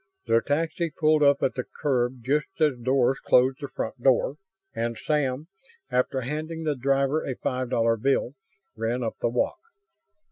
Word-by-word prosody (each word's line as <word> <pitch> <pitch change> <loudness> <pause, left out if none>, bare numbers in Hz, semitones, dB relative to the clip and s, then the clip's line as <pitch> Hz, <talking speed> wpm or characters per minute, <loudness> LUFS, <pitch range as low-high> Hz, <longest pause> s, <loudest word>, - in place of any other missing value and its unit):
The 115 -1 +3
taxi 165 +4 -1
pulled 155 0 +2
up 140 -1 +4
at - - +2
the 125 - -3
curb 125 -3 -1
just 150 +9 -1
as 150 -4 +3
Doris 130 +1 +2
closed 130 +2 +3
the 140 - -4
front 120 -1 -5
door; 135 +2 +3 0.4
and 115 0 -2
Sam, 145 -1 -1 0.4
after 125 +1 +1
handing 155 +5 -4
the 150 -2 0
driver 135 +3 +1
a 130 - -3
five 130 0 -2
dollar 115 -1 +2
bill, 135 +1 +1 0.4
ran 115 +3 -2
up 110 - -3
the - - +1
walk. 120 - -1
130 Hz, 165 wpm, -26 LUFS, 120-150 Hz, 0.4 s, up